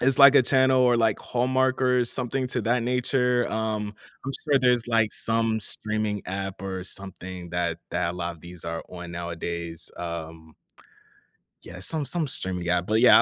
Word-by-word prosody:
it's 130 +1 +3
like 140 0 +9
a - - +7
channel, 130 +1 +4
or 125 -1 +5
like 115 -3 +2
Hallmark, 130 +1 +1
or 125 -1 +3
something 130 +2 -2
to 125 -1 -2
that 120 +2 +1
nature. 125 0 +2
Um, 110 -1 -2 0.3
I'm 135 - -2
sure 145 -3 +4
there's, 125 -2 +3
like, 115 -2 +2
some 115 -1 +1
streaming 105 -1 -2
app 95 +1 -4
or 95 -1 -4
something 95 -2 -7
that 85 -1 -1
that 85 - 0
a - - -9
lot 85 -1 -3
of - - -21
these 85 0 -11
are 85 0 -3
on 90 -1 -8
nowadays, 85 -1 -5
um 80 -2 -7 1.1
Yeah, 90 - -10
some 150 - -2
some 165 +1 0
streaming 90 -8 -2
app, 90 0 +2
but 110 +3 +2
yeah, 125 - +9
110 Hz, 175 wpm, -26 LUFS, 90-125 Hz, 1.1 s, like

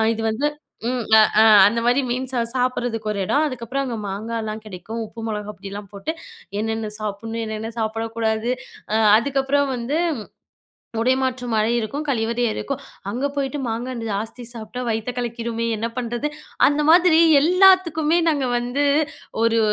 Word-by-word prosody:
இது 225 - -4
வந்து 275 +7 0 0.4
ம். 255 -1 -1 0.2
அ - - +8 0.2
அ - - +8 0.2
அந்தமாரி 235 +4 +2
மீன் 255 +1 -2
சா 250 - 0 0.2
சாப்பிடுறதுக்கு 245 -3 -1
ஒரு 200 - -3
இடம். 295 +10 +2
அதுக்கப்பறம் 255 +1 -3
அங்க 245 -3 -3
மாங்காலாம் 220 +1 -4
கெடைக்கும். 215 +4 -6
உப்பு 225 +1 -10
மொளகா 210 -1 -4
பொடிலாம் 200 0 -8
போட்டு, 200 +11 -3 0.5
என்னென்ன 220 0 -2
சாப்பிடணும், 220 +2 -4
என்னென்ன 220 0 -4
சாப்பிடக்கூடாது, 225 +1 -1 0.4
அ - - +3 0.2
அதுக்கப்பறம் 275 +2 +1
வந்து 245 +5 -2 1.0
உடை 255 +3 +3
மாற்றும் 250 -2 -2
அறை 220 +2 +2
இருக்கும். 280 +7 -4
கழிவறை 235 -1 0
இருக்கும். 275 0 -4 0.3
அங்க 250 +6 -1
போய்ட்டு 280 +1 -1
மாங்கா 235 +3 -3
இந் 230 - -5
ஜாஸ்தி 220 +4 -4
சாப்பிட்டா 230 +2 -6
வயித்த 225 +1 -1
கலக்கிருமே, 235 -1 -3
என்ன 225 +2 -2
பண்ணுறது? 240 +4 -2 0.4
அந்த 295 +1 0
மாதிரி 345 -1 +6 0.2
எல்லாத்துக்குமே 345 -3 +4
நாங்க 285 -5 +1
வந்து, 245 +4 -1 0.6
ஒரு 230 0 +3
235 Hz, 145 wpm, -22 LUFS, 220-270 Hz, 1.0 s, அ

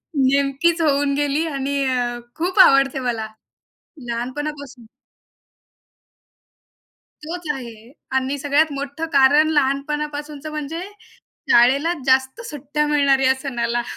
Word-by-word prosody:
नेमकीच 280 +5 +2
होऊन 285 -2 +2
गेली 290 +2 0
आणि 280 -1 -3
अ, 245 -2 -1 0.2
खूप 360 +4 -2
आवडते 275 -6 +5
मला, 235 -4 -3 0.8
लहानपणापासून. 260 +1 -5 2.4
तोच 345 +3 -6
आहे 235 -3 -10 0.3
आणि 265 +2 -1
सगळ्यात 290 +2 +1
मोठं 285 +3 -5
कारण 285 +3 +5
लहानपणापासूनचं, 295 +1 -2
म्हणजे 305 +2 -5 0.7
शाळेला 270 +8 +4
जास्त 265 - +2
सुट्ट्या 295 +1 -2
मिळणार 280 -2 +3
या 265 0 +3
सणाला. 240 -3 -2
280 Hz, 100 wpm, -21 LUFS, 265-300 Hz, 2.4 s, आवडते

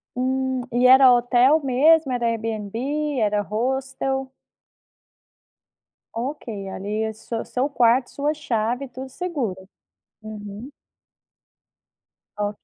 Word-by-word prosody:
Hum, 260 0 -1
e 245 +1 +4
era 260 0 +8
hotel 245 +5 +4
mesmo? 280 +3 +4
Era 240 -1 -1
Airbnb, 230 +6 -2
era 210 -1 +1
hostel? 265 +4 -2 1.8
Ok, 230 -5 -5
ali 210 +3 -3
é 220 0 -3
su 225 +1 -5
seu 265 +3 -1
quarto, 245 -1 +3
sua 290 +2 -1
chave, 245 -2 -2
tudo 260 +1 -8
seguro. 245 - -4 0.5
Uhum. 215 +4 -9 1.7
Ok. 205 0 -2
250 Hz, 100 wpm, -23 LUFS, 220-270 Hz, 1.8 s, era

